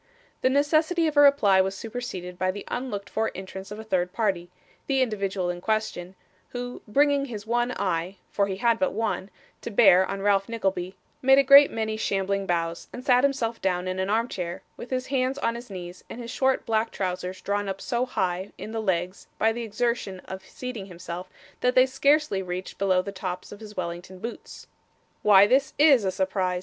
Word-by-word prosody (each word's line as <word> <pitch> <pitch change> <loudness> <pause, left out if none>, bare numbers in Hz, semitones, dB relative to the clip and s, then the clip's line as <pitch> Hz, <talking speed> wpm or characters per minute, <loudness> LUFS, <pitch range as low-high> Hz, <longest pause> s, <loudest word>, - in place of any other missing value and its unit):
The 255 - +3
necessity 310 +5 +2
of 310 -1 -1
a - - +5
reply 220 -10 +6
was 190 +1 -2
superseded 190 -7 -6
by 185 - +1
the 200 +2 -4
unlooked 245 -6 -4
for 220 0 -1
entrance 190 +1 -8
of 210 - -7
a 220 - -7
third 180 -4 0
party 190 -4 -1 0.4
the 270 -1 +1
individual 195 -5 -2
in 175 0 -7
question 215 -4 -2 0.3
who, 245 0 -6
bringing 285 +4 +3
his 220 -5 -7
one 240 +2 0
eye 185 -2 -2
(for 200 -1 +1
he 190 - -3
had 230 +3 +2
but 185 - +1
one) 210 -2 -2 0.3
to - - -5
bear 195 -4 +6
on 195 0 -4
Ralph 200 0 +2
Nickleby, 195 -5 -2 0.3
made 270 +1 +6
a 275 - +6
great 280 +1 +8
many 220 -1 -2
shambling 195 -1 -1
bows, 170 -1 -2
and 250 +1 -9
sat 250 -1 +4
himself 255 -5 0
down 180 -1 0
in 185 0 -2
an 190 +1 -1
armchair, 205 -6 -2
with 240 - -9
his 255 -1 -2
hands 260 0 0
on 230 -4 0
his 235 0 -9
knees, 180 -2 -8
and - - -8
his 235 0 -6
short 265 0 +1
black 225 0 +1
trousers 185 0 -4
drawn 200 +1 -2
up 195 0 -4
so 250 0 -1
high 185 -5 -2
in 215 - -7
the 225 0 -2
legs 185 -2 -2
by 225 - +3
the 235 +2 -4
exertion 225 -3 -2
of 190 0 -8
seating 245 -5 -7
himself, 180 0 -7 0.3
that 250 0 +1
they 255 0 +7
scarcely 280 -4 +2
reached 185 0 -6
below 185 -2 +2
the 200 - -5
tops 185 -2 -5
of 205 - -10
his 210 -2 -11
Wellington 175 +1 -5
boots. 230 +6 -8 0.6
'Why, 200 -1 +7
this 265 +5 +2
IS 280 -8 +6
a 190 - +1
surprise! 190 -1 -1
205 Hz, 200 wpm, -26 LUFS, 185-245 Hz, 0.6 s, great